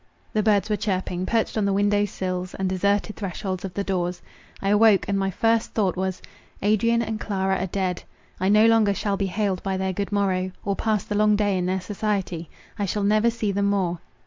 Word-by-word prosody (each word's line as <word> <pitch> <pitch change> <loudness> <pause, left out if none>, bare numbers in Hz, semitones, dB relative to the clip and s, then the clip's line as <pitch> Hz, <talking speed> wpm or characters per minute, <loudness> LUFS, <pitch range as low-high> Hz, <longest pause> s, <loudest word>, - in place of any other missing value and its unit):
The 215 - +2
birds 210 -2 +2
were 210 - +1
chirping, 185 -3 -2
perched 225 -1 0
on 205 - +1
the 200 - +1
windows 205 +1 +2
sills 185 -1 -4
and 190 - -1
deserted 200 +3 0
thresholds 190 -2 -4
of 190 -2 -6
the 200 - -1
doors. 180 -2 -2 0.4
I 195 - -1
awoke, 210 -1 +5
and 200 - 0
my 195 0 0
first 225 +4 +1
thought 200 -4 +1
was, 190 0 -3 0.4
Adrian 230 +3 +3
and 220 -1 -3
Clara 190 -2 -1
are 185 - -1
dead. 185 -1 -2 0.4
I 185 +1 +1
no 210 +2 +6
longer 225 -3 +4
shall 200 0 -1
be 195 0 -1
hailed 195 -1 -1
by 195 -1 -2
their 190 0 -1
good 200 +2 -3
morrow—or 195 0 -1
pass 215 -2 0
the - - -5
long 210 0 +4
day 205 -1 +1
in 180 -1 -1
their 190 0 0
society. 190 -5 -3 0.3
I 200 - 0
shall 205 +2 -1
never 215 +3 +3
see 225 -3 -2
them 200 +1 0
more. 190 -4 0
200 Hz, 210 wpm, -24 LUFS, 185-210 Hz, 0.4 s, no